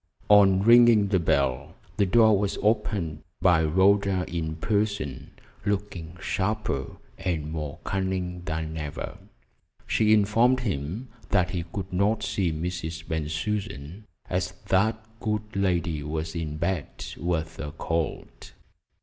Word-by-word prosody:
On 100 Hz, -2 st, +6 dB
ringing 115 Hz, -3 st, +7 dB
the 95 Hz, -2 st, +3 dB
bell, 70 Hz, -6 st, 0 dB, 0.2 s
the 100 Hz, -2 st, +3 dB
door 110 Hz, +2 st, +6 dB
was 100 Hz, -1 st, -1 dB
opened 105 Hz, -7 st, 0 dB, 0.2 s
by 85 Hz, -3 st, +4 dB
Rhoda 95 Hz, +3 st, +3 dB
in 80 Hz, -2 st, -3 dB
person, 100 Hz, -, -1 dB, 0.3 s
looking 95 Hz, -4 st, -3 dB
sharper 95 Hz, -11 st, -2 dB, 0.2 s
and 80 Hz, -4 st, -2 dB
more 75 Hz, -3 st, -4 dB
cunning 95 Hz, -2 st, -2 dB
than 80 Hz, 0 st, -3 dB
ever. 75 Hz, -2 st, -5 dB, 0.7 s
She 110 Hz, -1 st, +2 dB
informed 115 Hz, +5 st, +4 dB
him 100 Hz, -, -3 dB, 0.2 s
that 90 Hz, 0 st, +2 dB
he 90 Hz, -3 st, -3 dB
could 95 Hz, -1 st, -5 dB
not 105 Hz, +4 st, +1 dB
see 100 Hz, -4 st, 0 dB
Mrs. 80 Hz, 0 st, -4 dB
Bensusan, 80 Hz, +3 st, -3 dB, 0.2 s
as 90 Hz, 0 st, -1 dB, 0.2 s
that 110 Hz, +3 st, +2 dB
good 105 Hz, -1 st, -3 dB
lady 90 Hz, -5 st, 0 dB
was 80 Hz, +2 st, -3 dB
in 75 Hz, -2 st, -3 dB
bed 85 Hz, -2 st, -3 dB
with 80 Hz, -1 st, -2 dB
a 75 Hz, -, -4 dB
cold. 80 Hz, +1 st, -4 dB
90 Hz, 125 wpm, -26 LUFS, 80-105 Hz, 0.7 s, ringing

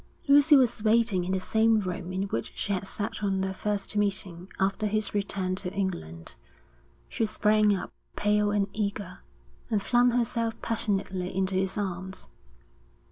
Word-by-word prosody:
Lucy 290 Hz, +2 st, +7 dB
was 250 Hz, -5 st, +3 dB
waiting 220 Hz, -4 st, +3 dB
in 185 Hz, -, -2 dB
the 190 Hz, -, +1 dB
same 220 Hz, +3 st, +3 dB
room 185 Hz, -2 st, -4 dB
in 190 Hz, +1 st, -1 dB
which 115 Hz, -, -3 dB
she 200 Hz, -, -1 dB
had 190 Hz, 0 st, -3 dB
sat 220 Hz, +2 st, -4 dB
on 195 Hz, -1 st, +1 dB
their 190 Hz, 0 st, -1 dB
first 205 Hz, +1 st, -3 dB
meeting 190 Hz, -3 st, -1 dB
after 200 Hz, +2 st, +1 dB
his 215 Hz, 0 st, 0 dB
return 195 Hz, -2 st, -1 dB
to 185 Hz, -1 st, -3 dB
England. 85 Hz, -, -4 dB, 0.7 s
She -, -, -2 dB
sprang 210 Hz, -1 st, +3 dB
up, 185 Hz, -, -6 dB, 0.2 s
pale 210 Hz, 0 st, +2 dB
and 205 Hz, -1 st, +1 dB
eager, 205 Hz, -, -3 dB, 0.5 s
and 215 Hz, -, +1 dB
flung 245 Hz, +4 st, +3 dB
herself 230 Hz, -1 st, 0 dB
passionately 195 Hz, -5 st, -2 dB
into 190 Hz, 0 st, 0 dB
his 190 Hz, +2 st, 0 dB
arms. 190 Hz, -1 st, -4 dB
200 Hz, 155 wpm, -27 LUFS, 190-215 Hz, 0.7 s, Lucy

